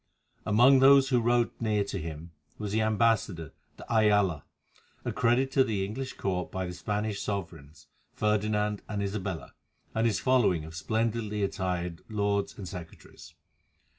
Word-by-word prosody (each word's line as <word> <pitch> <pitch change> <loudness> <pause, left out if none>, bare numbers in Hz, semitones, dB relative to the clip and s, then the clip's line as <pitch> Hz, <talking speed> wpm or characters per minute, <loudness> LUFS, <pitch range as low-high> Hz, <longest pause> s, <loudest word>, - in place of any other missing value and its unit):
Among 125 +6 +6
those 135 0 +6
who 125 -2 +3
rode 120 0 +2
near 105 -3 +1
to 100 - -4
him 80 +1 -7 0.3
was 105 -2 -4
the 110 +1 +1
ambassador, 110 -6 +1 0.2
de - - -11
Ayala, 105 - +2 0.6
accredited 125 +3 +1
to 135 -1 +4
the 105 -6 -1
English 130 +6 -5
Court 90 -2 -3
by 95 0 -3
the 90 - -5
Spanish 105 +3 -3
sovereigns, 80 -7 -6 0.3
Ferdinand 105 0 0
and 105 -1 -2
Isabella, 95 -3 -4 0.4
and 115 +1 +2
his 110 - 0
following 115 -11 +2
of 80 - -10
splendidly 110 +3 -1
attired 90 -4 -2
lords 100 -2 -1
and 100 - -7
secretaries. 85 -3 -11
105 Hz, 140 wpm, -28 LUFS, 95-115 Hz, 0.6 s, Among